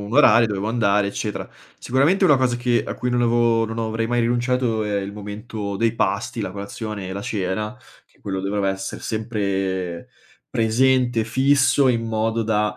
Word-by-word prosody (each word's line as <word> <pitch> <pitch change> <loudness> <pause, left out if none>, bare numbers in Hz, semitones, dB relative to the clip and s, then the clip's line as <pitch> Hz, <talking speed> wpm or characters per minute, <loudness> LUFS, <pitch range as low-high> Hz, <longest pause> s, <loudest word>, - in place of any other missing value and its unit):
un 100 +2 -7
orario, 115 -5 +6
dovevo 105 0 -2
andare, 105 -3 +2
eccetera. 105 +1 -4 0.3
Sicuramente 145 +10 +2
una 150 -6 +6
cosa 130 -2 +1
che 120 -1 +1
a - - -4
cui 125 - -3
non 120 0 +1
avevo 115 -1 +3
non 115 +1 -5
avrei 115 0 -1
mai 120 +1 +1
rinunciato 120 -1 +1
è 105 -1 -1
il 100 +1 -6
momento 105 0 -6
dei 115 +2 +1
pasti, 100 +2 -1
la 100 - -3
colazione 100 0 -6
e 95 - -5
la 100 - -5
cena, 105 +3 -3 0.3
che - - -31
quello 95 -1 -3
doveva 100 +1 -1
esser 95 0 -4
sempre 95 -5 -2 0.4
presente, 120 +1 +2
fisso, 135 +3 +3
in 115 -2 +1
modo 110 +1 0
da, 105 -1 0
110 Hz, 175 wpm, -22 LUFS, 100-120 Hz, 0.4 s, orario